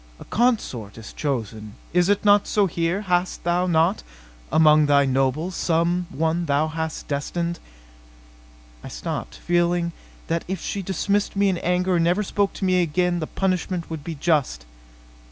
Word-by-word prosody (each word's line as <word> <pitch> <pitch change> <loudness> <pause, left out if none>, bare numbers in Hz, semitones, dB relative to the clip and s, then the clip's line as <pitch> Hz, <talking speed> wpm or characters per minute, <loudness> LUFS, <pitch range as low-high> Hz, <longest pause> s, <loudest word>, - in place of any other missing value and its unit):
A - - -11
consort 205 - -1
is 110 - -10
chosen. 110 -6 -4 0.2
Is 180 +1 +3
it 205 +1 +1
not 205 0 +5
so 205 -1 +2
here? 170 +2 -1
Has 180 -2 0
thou 175 +1 0
not, 160 - +2 0.5
among 155 -1 +5
thy 140 -1 +4
nobles, 135 +6 0
some 170 +1 0
one 160 +4 -1
thou 145 +2 +1
hast 160 0 -4
destined 170 +4 -2 0.6
" - - -26
I - - -7
stopped, - - -5
feeling 175 0 0 0.3
that 165 0 -1
if 190 +1 -3
she 200 - -4
dismissed 200 +2 -1
me 200 0 +3
in 180 -3 -1
anger 180 +1 +1
and 165 - +2
never 180 +5 +2
spoke 200 0 0
to 195 - -3
me 185 -1 +3
again 175 +2 0
the 155 - -3
punishment 185 -2 -2
would 160 -3 -5
be 165 +1 -5
just. 145 - 0
170 Hz, 165 wpm, -23 LUFS, 145-180 Hz, 0.6 s, not